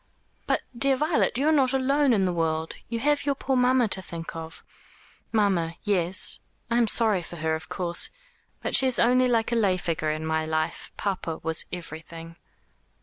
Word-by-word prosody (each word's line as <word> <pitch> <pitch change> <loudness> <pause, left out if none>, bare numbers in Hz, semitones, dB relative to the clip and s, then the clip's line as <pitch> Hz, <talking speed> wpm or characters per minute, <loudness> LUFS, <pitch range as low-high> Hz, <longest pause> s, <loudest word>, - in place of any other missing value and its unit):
"But, - - +1
dear 275 +3 +3
Violet, 300 -3 +1
you 280 +3 +1
are - - +5
not 270 -4 +3
alone 275 +1 +2
in 200 -5 +3
the 180 - 0
world. 160 -1 -1 0.2
You 230 0 -2
have 295 +1 +2
your 280 0 0
poor 265 0 -1
mamma 250 -1 +3
to 190 - -1
think 165 -2 -8
of." 165 0 -8 0.7
"Mamma 190 -7 +1
yes. 185 -3 +2 0.3
I 235 - +3
am 235 - +3
sorry 215 -4 +2
for 175 - -9
her, 160 -1 -1
of 160 +2 -5
course. 175 -2 0 0.5
But - - 0
she 265 - +4
is 255 - +2
only 250 +2 +4
like 230 -1 +1
a - - +1
lay 200 -5 +2
figure 165 -3 -2
in 155 +1 -3
my 160 0 0
life. 155 0 -3
Papa 185 -5 -3
was 160 0 +2
everything." 165 -1 -8
190 Hz, 190 wpm, -26 LUFS, 165-250 Hz, 0.7 s, are